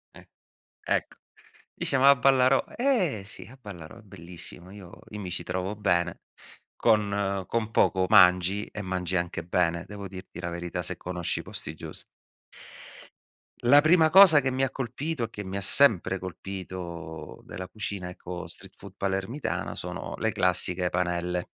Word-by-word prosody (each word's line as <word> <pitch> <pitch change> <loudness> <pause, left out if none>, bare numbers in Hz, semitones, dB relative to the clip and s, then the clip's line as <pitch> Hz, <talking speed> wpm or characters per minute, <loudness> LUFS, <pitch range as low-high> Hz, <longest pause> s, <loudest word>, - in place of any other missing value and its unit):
Eh, - - -15 0.6
ecco, - - -2 0.6
dice: 140 - 0
"Ma 135 +2 +7
a 140 - +6
Ballarò?", 130 0 +4
"Eh, 220 - +1
sì, 100 - -6
a 130 +3 -15
Ballarò 100 -1 -10
è - - -15
bellissimo, 90 -1 -7
io 95 -3 -12
i 105 - -7
mi 95 -3 -6
ci 85 - -4
trovo 90 +4 -3
bene. 85 -4 0 0.6
Con 100 -3 +1
con 115 0 -2
poco 95 -4 +2
mangi 95 0 +5
e 105 - -8
mangi 90 -1 -3
anche 85 0 -2
bene, 85 -1 0
devo 100 -1 -8
dirti 95 0 -10
la 85 - -4
verità 85 0 -4
se - - -2
conosci 90 -1 -4
i - - -7
posti 80 -1 -5
gius" - - -9 1.6
La 140 +5 +6
prima 160 0 +4
cosa 190 -5 +9
che 135 -1 -1
mi 130 +1 -2
ha 135 - +1
colpito 135 +2 -4
e - - -3
che 105 - -7
mi 95 0 -5
ha - - -3
sempre 95 -4 +5
colpito 90 -3 -7
della 90 0 -8
cucina 100 -2 -5
ecco 90 0 -7
street - - -7
food 100 -1 -12
palermitana 100 +8 -3
sono - - -6
le - - 0
classiche 90 0 +2
panelle. 90 0 -1
95 Hz, 160 wpm, -27 LUFS, 90-115 Hz, 1.6 s, cosa